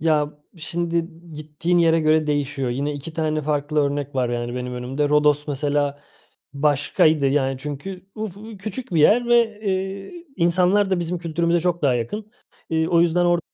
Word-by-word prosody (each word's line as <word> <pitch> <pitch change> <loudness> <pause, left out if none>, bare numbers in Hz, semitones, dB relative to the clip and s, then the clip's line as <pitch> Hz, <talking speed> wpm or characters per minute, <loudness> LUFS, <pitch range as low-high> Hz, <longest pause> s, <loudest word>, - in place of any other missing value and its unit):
Ya, 150 -2 +2 0.3
şimdi 170 +1 -2 0.2
gittiğin 155 +3 -1
yere 165 -1 +4
göre 155 0 +3
değişiyor. 145 -3 -1
Yine 140 +4 -2
2 145 +3 -7
tane 155 -1 -1
farklı 150 +1 0
örnek 145 -1 -2
var 125 -2 +1
yani 120 0 -3
benim 125 0 -4
önümde. 135 +4 -2
Rodos 150 0 +3
mesela 145 0 -1 0.5
başkaydı, 145 +1 +2
yani, 135 -1 +1
çünkü 150 +7 -7
uf 215 -4 -5
u 215 +1 -10
küçük 215 +2 -6
bir 160 - +4
yer 235 +10 +4
ve, 230 -3 +3
eee, 195 - -4
insanlar 180 +3 +3
da 185 -2 +1
bizim 175 +1 -2
kültürümüze 170 +1 0
çok 175 0 -1
daha 135 -4 +3
yakın. 205 - -4 0.4
Eee, 160 0 +1
o 170 -1 +4
yüzden 175 +1 +3
orada 175 0 +3
155 Hz, 170 wpm, -22 LUFS, 145-180 Hz, 0.5 s, yere